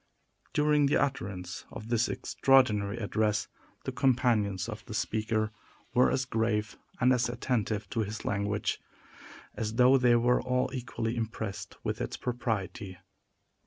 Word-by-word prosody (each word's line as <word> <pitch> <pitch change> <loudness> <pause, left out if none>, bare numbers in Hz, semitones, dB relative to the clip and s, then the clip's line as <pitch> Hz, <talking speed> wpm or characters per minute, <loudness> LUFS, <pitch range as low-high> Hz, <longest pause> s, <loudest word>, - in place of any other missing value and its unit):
During 150 -1 +3
the 140 - +3
utterance 95 -9 -3
of 110 0 -9
this 120 0 +2
extraordinary 110 -6 +2
address, 105 -1 0 0.4
the - - -3
companions 110 -8 +2
of - - -6
the - - -6
speaker 110 0 0 0.4
were 125 - +5
as 130 0 0
grave 110 -3 0 0.2
and 125 +1 +5
as 120 -1 +1
attentive 115 -4 -1
to 115 - -2
his 105 0 -3
language 100 0 -1 0.7
as 110 0 -3
though 130 +2 +6
they 125 -1 +5
were 120 +1 +3
all 125 0 0
equally 120 -2 -3
impressed 110 -3 -4
with - - -2
its - - -3
propriety. 100 -6 -3
115 Hz, 135 wpm, -30 LUFS, 105-125 Hz, 0.7 s, though